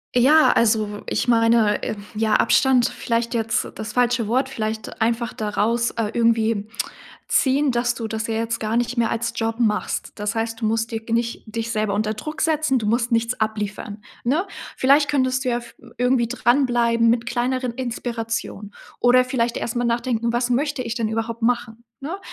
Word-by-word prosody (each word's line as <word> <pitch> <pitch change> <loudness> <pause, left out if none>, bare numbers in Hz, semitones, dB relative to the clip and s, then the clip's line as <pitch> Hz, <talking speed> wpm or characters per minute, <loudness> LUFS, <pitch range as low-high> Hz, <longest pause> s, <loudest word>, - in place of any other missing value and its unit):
Ja, 290 +6 +6
also, 215 -2 +1
ich - - -1
meine, 230 -2 +3
äh - - -3 0.2
ja, 215 0 +1
Abstand 255 -3 +4
vielleicht 235 0 -2
jetzt 225 -1 0
das 215 -1 -6
falsche 245 -2 +2
Wort. 255 +4 +1
Vielleicht 220 -4 -5
einfach 230 +1 0
daraus, 220 +3 0
äh, 225 -2 -2
irgendwie 225 -2 +1 0.6
ziehen, 275 +1 +3
dass 240 0 0
du 230 -2 -4
das 220 0 -3
ja 225 - -2
jetzt 230 0 -2
gar 220 +1 -1
nicht 240 +1 -1
mehr 230 -1 +2
als 230 0 -2
Job 225 0 -1
machst. 215 -3 0
Das 210 +1 -3
heißt, 225 +1 -3
du - - 0
musst 225 +1 -1
dir 225 -1 -3
nicht 235 +1 -1
dich 230 +1 -4
selber 215 -3 0
unter 215 +1 0
Druck 305 +9 -6
setzen, 310 -4 +2
du 225 - -2
musst 235 +3 +1
nichts 230 +1 0
abliefern, 210 -1 -3 0.2
ne? 295 +10 +1 0.3
Vielleicht 285 +3 +4
könntest 260 -2 +1
du 255 - 0
ja 240 0 0
v 235 - -14 0.2
irgendwie 250 -1 +2
dranbleiben 240 -1 +2
mit 235 0 +1
kleineren 250 +1 -1
Inspirationen. 230 -4 -4 0.3
Oder 250 +1 +5
vielleicht 240 -2 -1
erst 235 - -3
mal 245 - 0
nachdenken: 235 -1 0
„Was 240 +1 0
möchte 280 +1 0
ich 230 -1 -3
denn 230 -3 -1
überhaupt 225 +1 -3
machen“, 230 -1 -1 0.2
ne? 320 +8 -4
235 Hz, 180 wpm, -22 LUFS, 225-245 Hz, 0.6 s, Ja